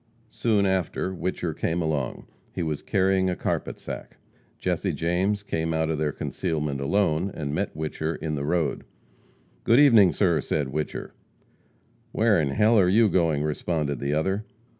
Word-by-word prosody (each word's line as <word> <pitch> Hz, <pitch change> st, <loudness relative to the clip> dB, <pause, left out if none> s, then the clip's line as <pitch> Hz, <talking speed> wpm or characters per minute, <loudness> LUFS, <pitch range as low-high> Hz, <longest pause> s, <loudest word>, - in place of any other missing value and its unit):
Soon 110 Hz, -3 st, +1 dB
after 95 Hz, 0 st, -1 dB
Whicher 90 Hz, -2 st, -3 dB
came 85 Hz, +1 st, -1 dB
along. 75 Hz, -6 st, -2 dB, 0.3 s
He -, -, -1 dB
was 75 Hz, -2 st, -2 dB
carrying 95 Hz, -1 st, +2 dB
a 90 Hz, -, -1 dB
carpet -, -, -2 dB
sack. -, -, -8 dB, 0.4 s
Jesse -, -, -1 dB
James 95 Hz, +5 st, 0 dB
came 80 Hz, -4 st, -2 dB
out 80 Hz, 0 st, 0 dB
of 75 Hz, -, -2 dB
their 75 Hz, -1 st, 0 dB
concealment 75 Hz, -4 st, -3 dB
alone, 90 Hz, +2 st, +1 dB
and 70 Hz, -2 st, -4 dB
met -, -, -2 dB
Whicher 80 Hz, +1 st, -3 dB
in 80 Hz, -1 st, -4 dB
the 70 Hz, -1 st, -2 dB
road. 80 Hz, 0 st, 0 dB, 0.8 s
"Good 115 Hz, +3 st, +5 dB
evening, 115 Hz, -11 st, +7 dB
sir," 85 Hz, -6 st, +2 dB
said 75 Hz, -3 st, -1 dB
Whicher. 75 Hz, +2 st, -4 dB, 1.0 s
"Where 110 Hz, -6 st, +3 dB
in 70 Hz, -, 0 dB
h -, -, -5 dB
ll 110 Hz, +1 st, +5 dB
are 90 Hz, -2 st, +4 dB
you 110 Hz, +3 st, +5 dB
going?" 80 Hz, -6 st, +1 dB
responded 75 Hz, -2 st, -2 dB
the 70 Hz, +1 st, -1 dB
other. 95 Hz, +7 st, 0 dB
85 Hz, 160 wpm, -25 LUFS, 75-95 Hz, 1.0 s, evening